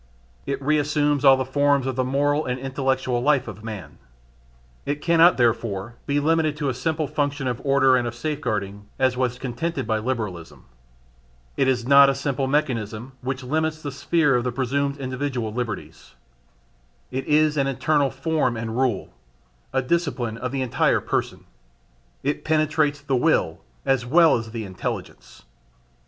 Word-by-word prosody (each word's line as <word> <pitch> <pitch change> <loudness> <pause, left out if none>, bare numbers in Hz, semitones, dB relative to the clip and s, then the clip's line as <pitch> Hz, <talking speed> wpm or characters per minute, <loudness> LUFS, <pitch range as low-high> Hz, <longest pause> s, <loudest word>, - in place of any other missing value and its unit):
It 140 -1 -2
reassumes 145 -1 +1
all 135 -1 +7
the 130 - -1
forms 140 0 +2
of 130 -1 -2
the 130 - +1
moral 145 +3 +1
and 125 0 -3
intellectual 130 -2 -1
life 135 -1 +2
of 105 -1 -9
man. 105 -6 -8 0.8
It 145 +1 -2
cannot, 170 +2 +5
therefore, 115 -3 0
be 145 0 +1
limited 155 0 +1
to 145 -3 -1
a - - -1
simple 155 +5 -1
function 145 -1 -2
of 125 0 -3
order 135 -2 +4
and 120 -1 +1
of 120 - -5
safeguarding, 105 -8 -3
as 130 -1 +2
was 125 -1 -1
contended 135 +7 -3
by 110 -1 0
Liberalism. 105 -8 -4 0.9
It 135 - +2
is 125 -3 +1
not 140 +1 +7
a 135 - 0
simple 135 -1 -2
mechanism 125 -5 -1
which 130 0 -4
limits 155 +4 -1
the 145 - -4
sphere 145 0 +2
of 120 - +1
the 125 - -1
presumed 140 +3 -1
individual 130 -4 -3
liberties. 115 -4 -6 1.0
It 130 +1 -4
is 155 0 +3
an 140 -2 +1
internal 140 +1 +1
form 135 -2 -1
and 110 0 -4
rule, 125 -8 -1 0.6
a 130 0 0
discipline 135 -7 -1
of 125 - -3
the 135 -1 -1
entire 125 - +2
person: - - -3 0.8
it 145 - -1
penetrates 155 -1 +1
the 140 -2 -1
will 125 - +1 0.3
as 135 -3 +2
well 160 +6 +5
as 115 -1 -4
the 110 -1 -5
intelligence. 95 -1 -6
135 Hz, 160 wpm, -23 LUFS, 120-145 Hz, 1.0 s, all